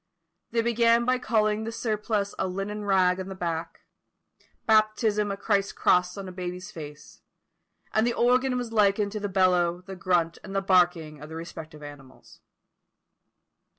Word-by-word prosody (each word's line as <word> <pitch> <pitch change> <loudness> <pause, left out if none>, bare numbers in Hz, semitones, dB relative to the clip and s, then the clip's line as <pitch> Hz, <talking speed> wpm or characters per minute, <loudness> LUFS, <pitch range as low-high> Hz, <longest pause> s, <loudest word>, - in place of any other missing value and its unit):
They 230 -1 0
began 235 0 +3
by 255 0 +2
calling 215 -3 +1
the 225 - -4
surplice 215 -3 -2
a - - 0
linen 200 +3 -4
rag 185 -2 +3
on 190 - -5
the 190 - -6
back; 165 -2 -4 0.8
baptism 215 -1 +2
a 195 - -3
Christ's 200 -1 0
cross 180 +1 +2
on 195 -1 -6
a - - -7
baby's 180 0 -6
face; 150 -2 -11 0.7
and 220 +2 +3
the 240 - +1
organ 250 +2 +2
was 240 -2 -4
likened 205 -1 +2
to 215 - -4
the 205 0 -3
bellow, 180 -2 +2
the 190 - -7
grunt, 170 -2 0
and 195 - -8
the 195 - +2
barking 175 -5 +2
of 150 - -9
the 160 - -8
respective 160 -2 -9
animals. 145 -3 -13
195 Hz, 160 wpm, -26 LUFS, 175-215 Hz, 0.8 s, began